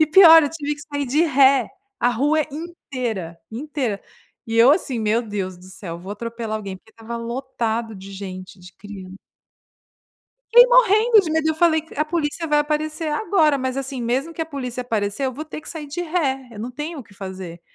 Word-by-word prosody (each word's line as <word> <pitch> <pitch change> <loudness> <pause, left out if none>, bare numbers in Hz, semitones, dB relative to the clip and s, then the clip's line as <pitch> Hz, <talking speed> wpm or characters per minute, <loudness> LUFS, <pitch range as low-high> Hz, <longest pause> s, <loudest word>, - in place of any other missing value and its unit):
E 310 - +5
pior 325 0 +9
eu 290 - -1
tive 295 -2 -3
que 290 - -12
sair 285 -1 -1
de 290 +6 +2
ré, 275 -4 +4 0.3
a 245 - +4
rua 290 +6 +2
inteira, 255 - -5
inteira. 250 -3 -3 0.4
E 225 - -4
eu 235 +3 +7
assim: 280 -7 -1
"Meu 220 +2 +1
Deus 195 -5 -4
do 180 - -16
céu, 185 -2 -8
vou 190 +4 -7
atropelar 230 0 -4
alguém", 195 -3 -6
porque 220 +4 -22
estava 230 +1 -7
lotado 235 -2 -3
de 195 0 -10
gente, 185 -1 -8
de 180 +1 -14
crian 195 -2 -10 1.4
Fiquei 485 +1 +9
morrendo 460 -2 +5
de 340 -5 -4
medo, 315 0 +1
eu 315 - +1
falei: 320 -1 +3
"A 300 - +1
polícia 325 0 -2
vai 300 -1 +3
aparecer 310 +2 -2
agora", 315 -6 +2
mas, 260 0 -2
assim, 270 -1 -4
mesmo 260 +7 -1
que 330 - -7
a 320 - -1
polícia 255 -5 -5
aparecer 220 0 -2
eu 260 - -2
vou 295 +5 -6
ter 310 - -8
que - - -12
sair 315 -3 -6
de 290 +5 -5
ré, 295 -7 -1
eu 220 - -11
não 230 +4 -5
tenho 300 +5 -6
o - - -9
que 205 - -21
fazer. 190 -3 -8
265 Hz, 205 wpm, -22 LUFS, 220-310 Hz, 1.4 s, pior